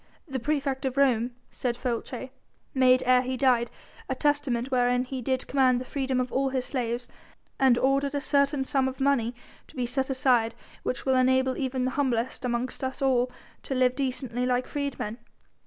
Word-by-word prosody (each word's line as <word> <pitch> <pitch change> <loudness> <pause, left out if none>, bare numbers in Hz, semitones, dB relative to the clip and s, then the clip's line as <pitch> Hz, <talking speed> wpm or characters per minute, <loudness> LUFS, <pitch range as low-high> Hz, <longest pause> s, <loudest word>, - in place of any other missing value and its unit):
"The 265 -3 -3
praefect 275 0 -1
of 260 0 -2
Rome," 245 -3 +2 0.2
said 240 -2 -2
Folces, 250 +1 -3 0.4
"made 255 -1 +4
ere 250 0 +5
he 255 0 -3
died 245 -3 +3 0.4
a - - 0
testament 275 -4 0
wherein 245 0 +2
he 260 0 -5
did 260 +2 -1
command 260 -2 +3
the 255 - -6
freedom 265 -1 -1
of 250 0 -2
all 270 +1 +1
his 260 -1 -1
slaves, 245 -2 -2 0.5
and 260 -3 +5
ordered 275 +2 +1
a - - +1
certain 280 -1 +1
sum 270 -2 +2
of 260 0 -5
money 260 -4 +1 0.3
to - - -18
be 250 -2 -1
set 265 +2 -1
aside 250 -4 +2 0.3
which 250 - -3
will 265 - +3
enable 260 0 +3
even 260 -2 -1
the 255 - 0
humblest 260 -3 -1
amongst 250 +2 -2
us 260 +1 -3
all 250 -2 +2 0.3
to 270 - -4
live 255 0 +3
decently 255 -3 -2
like 250 0 +1
freedmen. 280 -6 -4
260 Hz, 180 wpm, -27 LUFS, 250-270 Hz, 0.5 s, ere